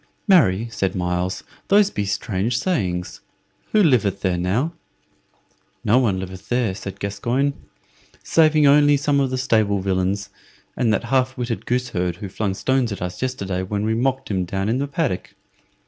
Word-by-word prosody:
"Marry," 120 - +4
said 95 -4 -1
Myles, 90 0 -2 0.2
"those 205 0 +5
same - - -22
be 105 - -1
strange 100 +3 -1
sayings. 90 - -2 0.5
Who 215 -1 +4
liveth 105 - +2
there 95 -2 +1
now?" 100 - 0 1.1
"No 120 +5 +5
one 105 -7 +1
liveth 95 +1 -8
there," 120 -5 +1
said 95 0 -8
Gascoyne, 120 +8 -1 0.7
"saving 155 -2 +4
only 145 +1 +6
some 140 0 +1
of 135 -1 +1
the 130 - -2
stable 110 -6 +2
villains, 95 +1 -1 0.4
and 115 -3 +1
that 110 - +1
half 130 +1 0
witted 120 -2 -4
goose 125 +1 0
herd 90 -5 -1
who 100 +1 -7
flung 100 0 -2
stones 130 +1 0
at 100 - -4
us 90 0 -5
yesterday 100 -8 -2
when 100 +2 -2
we 110 - +1
mocked 130 +1 -1
him 95 -2 0
down 95 +3 -2
in 120 +3 +1
the 140 - -1
paddock. 140 - -2
110 Hz, 170 wpm, -22 LUFS, 95-130 Hz, 1.1 s, only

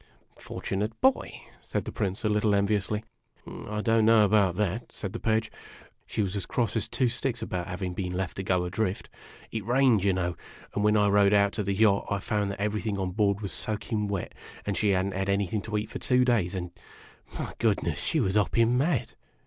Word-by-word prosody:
" - - -27
Fortunate 105 +3 -3
boy! 265 0 +1
" - - -26
said - - -3
the - - -5
Prince, 95 0 -2
a - - +4
little 105 0 +2
enviously. 105 +1 0 0.3
" - - -33 0.2
I 105 0 -2
don't 115 0 +3
know 110 -1 +6
about 100 -3 +3
that," 105 +4 -2
said 95 -3 -6
the - - -4
Pagfe. 110 0 0 0.3
" - - -27
She 110 - -1
was 95 0 -2
as 100 - -3
cross 120 -3 -1
O - - +3
as - - -4
two 130 - +1
sticks 120 -1 -2
about 90 -5 -3
having 90 0 -4
been 90 -1 -3
left 95 -1 -3
to 95 - -3
go 90 -1 +1
adrift. 95 +2 -2 0.4
It 110 -2 -3
rained, 120 -2 +3
you 100 - +3
know; 90 -1 -1 0.4
and 105 - -1
when 105 0 +4
I 105 0 +4
rowed 100 0 +4
out 100 0 +4
to 105 - -2
the 100 0 -1
yacht, 100 -1 +3
I 100 - +1
found 105 +1 -1
that 100 - -5
everything 105 0 -1
on 95 -1 -2
board 100 0 +1
was 100 - -4
soaking 105 0 -2
wet, 100 -3 -3 0.3
and 100 - -1
she 105 - +1
had 95 -1 +2
n't 100 - -3
had 95 +1 -2
anything 100 +1 0
to 105 +1 -3
eat 105 +1 -4
for - - -5
two 125 -1 +3
days, 105 -7 +1
and 90 -2 -4 0.7
my - - -4
goodness! - - +1
she 160 - +1
was 95 -8 +1
hopping 115 +3 +3
mad!" 135 -6 0
105 Hz, 230 wpm, -28 LUFS, 95-110 Hz, 0.7 s, know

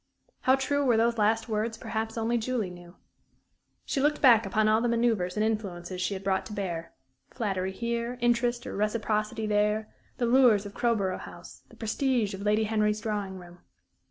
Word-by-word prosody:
How 260 +1 +4
true 285 +2 0
were 245 -4 +3
those 230 0 +2
last 220 +2 +2
words, 220 0 -2
perhaps 225 0 -4
only 230 +1 0
Julie 225 -5 -2
knew. 175 0 -13 0.9
She 275 - -1
looked 295 +1 +2
back 230 -6 +6
upon 215 +2 +2
all 215 +1 +3
the 240 - +1
manoeuvres 230 -6 +1
and 215 - +2
influences 185 -5 -3
she 195 +2 -1
had 190 - -7
brought 190 -1 +1
to 215 - -8
bear 175 -5 -4 0.4
flattery 195 -6 -2
here, 235 +3 -3
interest 240 0 +1
or - - -5
reciprocity 215 +1 -1
there, 210 +1 0 0.2
the 240 - 0
lures 235 -4 +5
of 205 - -8
Crowborough 210 -7 0
House, - - -11
the - - -16
prestige 230 -1 0
of 195 - -6
Lady 210 +1 +2
Henry's 215 -1 +1
drawing 205 -4 -3
room. 175 -1 -13
215 Hz, 180 wpm, -28 LUFS, 200-235 Hz, 0.9 s, back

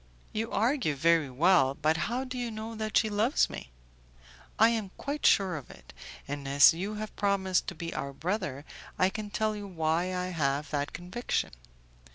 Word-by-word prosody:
"You 225 +1 -2
argue 230 - +1
very 160 0 +3
well, 140 0 +3
but 155 +1 +2
how 235 +10 -1
do 255 -1 -7
you 245 -1 -2
know 220 +1 -6
that 215 -1 -1
she - - +3
loves 215 +5 +2
me?" - - -8 0.9
"I 225 +2 +6
am 220 -4 -1
quite 285 +2 0
sure 190 -4 +3
of 140 - -10
it, - - -14 0.3
and 145 -1 -5
as 140 +3 +7
you 195 +6 -4
have 215 0 -6
promised 195 -2 +1
to 185 - -4
be 165 +1 -5
our 140 - -4
brother, 165 -2 -3 0.3
I 185 +1 +3
can 215 0 -5
tell 215 +1 -1
you 205 -1 -6
why 165 -1 0
I 180 0 -2
have 145 -3 -1
that 145 -1 -1
conviction. 180 +8 -3
185 Hz, 185 wpm, -29 LUFS, 155-215 Hz, 0.9 s, as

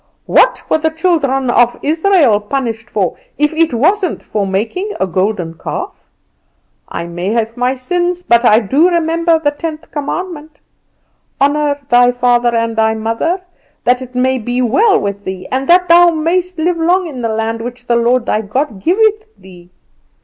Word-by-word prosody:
What - - +2
were - - +1
the 320 +1 +1
children 300 -6 0
of 240 0 +3
Israel 320 - +3
punished 230 0 -4
for, 190 -7 -1 0.2
if 300 +2 +1
it 325 0 +1
wasn't 360 - 0
for 205 -2 -2
making 220 - -2
a - - +1
golden 185 -2 -2
calf? 165 - -5 1.0
I 170 - -4
may 175 +2 -5
have 230 -1 -1
my 250 +1 0
sins, 355 +6 -2
but 235 -5 +3
I 220 -1 +5
do 280 - +2
remember 335 -1 +1
the 295 -2 0
tenth 315 +1 -7
commandment: 310 0 -5 0.8
'Honour 285 +1 +1
thy 245 0 +4
father 245 -1 +1
and 230 0 -1 0.3
mother 320 +12 -1 0.4
that 250 +1 +2
it 250 -1 -10
may 260 +1 +1
be 245 +2 -3
well 390 - +3
with 200 0 -4
thee, 185 -1 -6
and 265 +1 -2
that 360 +1 +5
thou 345 +1 +6
mayest 345 +3 -1
live 340 +2 0
long 355 +3 +1
in 275 -7 -7
the 230 - -1
land 225 +1 -2
which 245 +1 -7
the 235 - +1
Lord 240 +1 +2
thy 215 - 0
God 220 0 -3
giveth 430 +4 +2
thee! 180 -2 -16
260 Hz, 165 wpm, -14 LUFS, 230-330 Hz, 1.0 s, thou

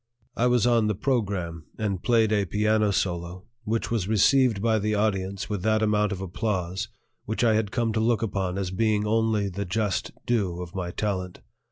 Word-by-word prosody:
I 125 - +2
was 125 -2 +3
on 115 -3 +3
the 105 - 0
program, 95 - -2
and 100 -4 -2
played 115 -3 +3
a 105 -2 +2
piano 105 +3 +2
solo 90 -1 -2 0.2
which 115 +2 -1
was 110 -6 0
received 110 +2 +4
by 110 +1 +2
the 105 +1 0
audience 100 -2 -1
with 105 -4 -3
that 110 +2 +2
amount 105 -1 +2
of 95 -1 -4
applause 95 +1 -2 0.4
which 110 +3 -2
I 115 -2 +4
had 110 -1 +1
come 115 0 0
to 110 - 0
look 115 0 +2
upon 95 -4 -2
as 95 -2 -2
being 105 +1 +1
only 110 -1 +1
the 100 +1 -4
just 100 +1 -1 0.2
due 100 -8 0
of 90 0 -7
my 90 -2 -3
talent. 95 -1 -3
105 Hz, 190 wpm, -26 LUFS, 95-110 Hz, 0.4 s, received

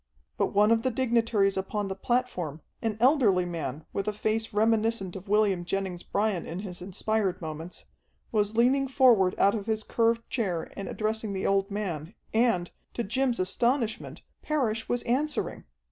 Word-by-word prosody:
But - - +1
one 210 +2 +3
of 230 0 +4
the 260 - +1
dignitaries 230 -5 +2
upon 195 +2 -2
the 190 - -2
platform, 190 - -1 0.2
an 220 -2 -1
elderly 235 - +4
man 155 -4 -4
with 200 - -2
a 210 - 0
face 220 +2 -1
reminiscent 220 -2 +1
of 190 +1 -8
William 205 -4 +3
Jennings 185 -1 -3
Bryan 205 -3 -1
in 165 - -5
his 180 -4 -6
inspired 195 0 -1
moments, 160 +1 -7 0.5
was 210 -1 +1
leaning 265 +3 +4
forward 245 -9 +4
out 200 - +4
of 215 -1 -4
his 220 -1 0
curved 230 +1 +1
chair 185 -10 -2
and 195 - -5
addressing 215 -1 -2
the 190 - -2
old 195 0 +2
man, 190 -3 -4 0.2
and, 220 -7 +2 0.2
to 235 - -1
Jim's 250 +3 0
astonishment, 230 +5 0 0.2
Parrish 230 -8 -1
was 245 0 0
answering. 285 +6 -1
210 Hz, 160 wpm, -28 LUFS, 190-230 Hz, 0.5 s, of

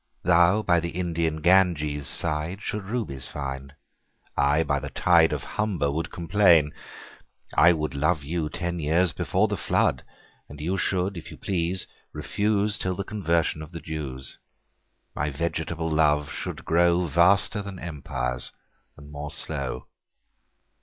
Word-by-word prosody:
Thou 90 +4 +4
by 85 -4 +3
the 85 +1 -3
Indian 85 -3 -2
Ganges 80 -6 +3
sideShould'st 85 +7 -2
Rubies 70 - -3
find: 70 -1 -6 0.6
I 70 +3 +3
by 70 - 0
the 70 0 -6
TideOf - - +3
Humber 95 -10 -1
would 80 +3 -3
complain. 85 -4 +4 0.8
I 85 +4 +7
wouldLove 75 0 0
you 80 +1 -2
ten 85 +1 -3
years 80 +3 +2
before - - +1
the - - -2
Flood:And 75 - -3
you 85 +6 -1
should 95 0 -1
if 85 - -8
you - - -10
please 90 -1 -2 0.3
refuseTill 100 -3 0
the 100 - -2
Conversion 85 -6 0
of 80 +2 -10
the 85 - -5
Jews.My 70 0 -8
vegetable 80 +2 -3
Love 75 -2 +2
should - - -6
growVaster 85 +4 +3
then 100 -2 -7
Empires, 65 -7 -4 0.5
and 70 +1 -13
more 75 0 -6
slow. 70 -3 -5
85 Hz, 125 wpm, -26 LUFS, 75-90 Hz, 0.8 s, I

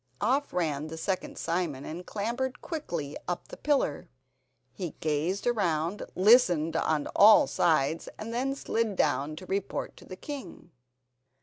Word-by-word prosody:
Off 265 +7 +1
ran 155 -4 -1
the 160 +1 -7
second 185 +3 -3
Simon 165 -5 -2
and 175 +3 -7
clambered 240 +5 -2
quickly 170 - -4
up 175 - -4
the - - -8
pillar. 285 - 0 0.6
He 175 +2 -5
gazed 155 +6 -1
around, 180 -6 0
listened 180 -6 +5
on 155 -2 +1
all 220 +9 +8
sides, 160 - +1
and 225 +2 -6
then 270 +3 0
slid 230 -6 -1
down 145 -1 +1
to 185 - -9
report 195 +1 -3
to - - -14
the 185 - -8
king. 275 - -8
180 Hz, 140 wpm, -29 LUFS, 155-230 Hz, 0.6 s, all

